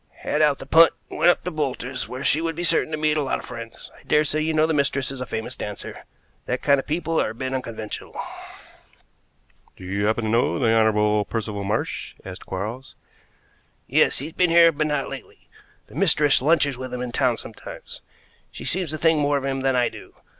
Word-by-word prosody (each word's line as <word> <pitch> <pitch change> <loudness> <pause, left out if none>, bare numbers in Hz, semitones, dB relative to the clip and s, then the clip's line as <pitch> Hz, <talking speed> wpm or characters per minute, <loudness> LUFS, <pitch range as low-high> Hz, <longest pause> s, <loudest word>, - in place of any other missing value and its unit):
"Had 150 - 0
out 150 -2 +4
the - - -9
punt 165 +4 +6 0.2
and - - -6
went - - +6
up 175 - +2
to 180 - -3
Boulter's, 135 -4 -3
where 130 +2 -6
she 155 - +3
would 165 -1 -2
be 175 - -3
certain 165 -2 +1
to 155 - -1
meet 155 0 +1
a - - +2
lot 135 - -1
of - - -10
friends. 115 -2 -9
I - - -18
dare 150 - +3
say 155 +1 -1
you 160 +1 0
know 155 0 +3
the 160 - 0
mistress 140 -2 0
is 135 -2 -7
a 125 - -4
famous 110 +3 -4
dancer. 105 -1 -7 0.4
That 125 - -2
kind 140 -1 +4
of - - -6
people 165 +1 0
are - - 0
a 110 - -8
bit 130 +2 -4
unconventional." 115 -4 -6 1.6
"Do - - -12
you 100 +2 -1
happen 110 +2 0
to 110 - -1
know 115 +2 +2
the 120 -5 +2
Honorable 105 -1 +3
Percival 105 -3 -3
Marsh?" 105 +3 -3
asked 90 -1 -9
Quarles. 110 +8 -5 0.9
"Yes. - - +3
He's 155 +4 -5
been 180 -1 +2
here, 165 0 +7
but 155 0 -1
not 145 -2 -1
lately. - - -10 0.4
The - - -18
mistress 150 -5 +3
lunches 145 -3 +2
with 130 -1 -6
him 125 0 -4
in 125 - -4
town 125 -2 +1
sometimes. 110 - -10 0.5
She - - -9
seems 180 -2 -1
to 155 - -4
think 160 0 +3
more 145 0 +2
of 135 - -4
him 135 -1 -1
than 135 -1 +1
I 125 -1 +3
do. - - -13
135 Hz, 220 wpm, -23 LUFS, 115-155 Hz, 1.6 s, here